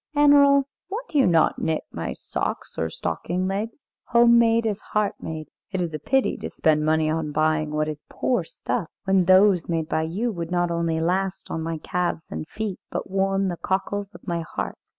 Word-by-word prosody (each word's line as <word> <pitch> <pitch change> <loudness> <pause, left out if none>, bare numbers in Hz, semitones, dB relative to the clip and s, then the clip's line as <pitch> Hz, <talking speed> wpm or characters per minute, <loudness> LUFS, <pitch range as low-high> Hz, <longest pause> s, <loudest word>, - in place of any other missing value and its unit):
"Annerl, 285 -1 +6 0.2
why 400 +4 -3
do 295 - +1
you 270 - +5
not 165 -3 +3
knit 160 -1 -1
my - - -4
socks - - -4
or 80 - 0
stocking 180 - -2
legs? 215 +7 -4
Home 235 0 +6
made 230 0 +3
is 210 -2 -1
heart 210 -1 -1
made. 155 -1 -6 0.2
It 190 - -2
is 170 -3 -2
a 155 - -3
pity 265 - +1
to - - -5
spend 155 -1 +2
money 155 0 +2
on 155 -1 -1
buying 155 0 +1
what 155 0 0
is 150 -1 -5
poor 250 - 0
stuff, - - -3
when 190 -2 +3
those 185 -1 +5
made 165 -2 0
by 160 - 0
you 195 +10 -1
would 170 -4 -5
not 175 -1 +1
only 170 -1 0
last 185 +3 -1
on 160 - -2
my 165 0 -3
calves 175 0 -2
and 155 - -5
feet, 215 -1 -4
but - - -5
warm 195 0 +1
the 175 - -4
cockles 200 +2 -2
of - - -13
my 170 -1 -1
heart." 160 - -5
180 Hz, 200 wpm, -24 LUFS, 160-210 Hz, 0.2 s, Annerl